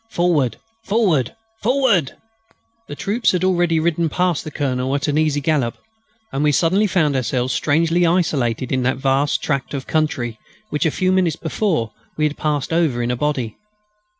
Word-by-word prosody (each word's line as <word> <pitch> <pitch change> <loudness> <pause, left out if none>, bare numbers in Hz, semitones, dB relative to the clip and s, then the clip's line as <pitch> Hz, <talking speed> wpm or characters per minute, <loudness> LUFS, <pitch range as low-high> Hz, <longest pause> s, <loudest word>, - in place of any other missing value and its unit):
Forward! 160 - +1 0.3
Forward! 195 - +1 0.3
Forward! 230 - +2 0.7
The 145 - -7
troops 215 +8 0
had 180 0 0
already 175 -3 +2
ridden 165 0 +1
past 180 0 0
the - - -6
Colonel 130 -2 -1
at 140 - -1
an 145 - 0
easy 150 -2 +1
gallop, 140 -5 0 0.5
and 140 - -1
we 150 - +4
suddenly 180 +9 +2
found 160 -7 +1
ourselves 130 0 0
strangely 165 +5 +2
isolated 145 -9 +1
in 130 -1 +1
that 130 +1 0
vast 135 +2 +1
tract 140 0 -2
of 135 - -4
country 125 -8 -1 0.3
which, 150 +3 +1
a - - +3
few 185 +4 0
minutes 185 -4 +2
before, 160 - -1 0.3
we 155 - +2
had 150 - -5
passed 150 0 -1
over 155 -8 +1
in 120 - 0
a - - 0
body. 130 -5 -2
150 Hz, 170 wpm, -20 LUFS, 130-175 Hz, 0.7 s, we